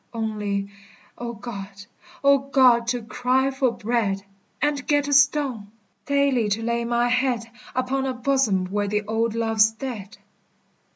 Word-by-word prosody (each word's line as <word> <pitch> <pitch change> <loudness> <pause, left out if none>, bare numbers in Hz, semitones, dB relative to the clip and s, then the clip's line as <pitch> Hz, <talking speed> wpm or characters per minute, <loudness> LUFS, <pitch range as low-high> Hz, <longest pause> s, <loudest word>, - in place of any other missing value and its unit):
Only 205 -3 -2 0.4
O 235 0 -5
God, 200 -3 -8 0.4
O 280 0 +6
God, 260 -4 +4
to 245 -1 -1
cry 255 +3 +1
for 265 -1 +1
bread. 215 -4 -1 0.4
And 290 -2 -1
get 290 -1 +2
a 285 - 0
stone! 275 -6 +3 0.4
Daily 280 -6 +2
to 215 +3 -1
lay 235 0 -1
my 240 0 +1
head 245 -1 +1 0.3
Upon 265 +1 0
a 260 - -1
bosom 245 -7 +1
where 205 0 0
the 210 +1 -1
old 225 +1 -1
love's 225 -1 +3
dead! 220 -3 -7
235 Hz, 140 wpm, -24 LUFS, 215-265 Hz, 0.4 s, O